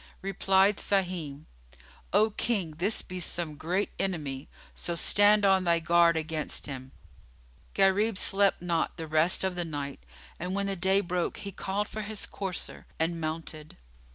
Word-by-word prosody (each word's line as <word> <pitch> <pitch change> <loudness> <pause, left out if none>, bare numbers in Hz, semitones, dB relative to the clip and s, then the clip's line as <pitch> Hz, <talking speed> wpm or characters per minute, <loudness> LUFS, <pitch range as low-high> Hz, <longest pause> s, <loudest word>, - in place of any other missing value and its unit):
Replied 195 +1 +3
Sahim, 175 -7 -1 0.7
"O 215 +3 +3
King, 200 -6 -1
this 200 +5 +1
be 185 0 -7
some 170 -2 -1
great 175 +7 -2
enemy; 150 -7 -3 0.2
so 170 - -3
stand 205 +4 +4
on 190 -1 +4
thy 170 -1 +3
guard 170 0 +4
against 160 -1 -2
him." 130 -2 -7 0.8
Gharib 200 +2 +3
slept 195 -1 +4
not 170 -2 -1
the 160 - -5
rest 155 +4 +3
of 190 -1 0
the 175 0 -3
night 145 -4 -5 0.4
and, 180 +3 -3
when 200 0 -1
the 195 0 -2
day 190 +2 +2
broke, 175 -2 -2
he 200 -2 -7
called 195 +2 -3
for 215 - -6
his 210 0 -5
courser 190 -3 -6
and 165 +1 -1
mounted. 155 -1 -6
180 Hz, 155 wpm, -28 LUFS, 160-195 Hz, 0.8 s, stand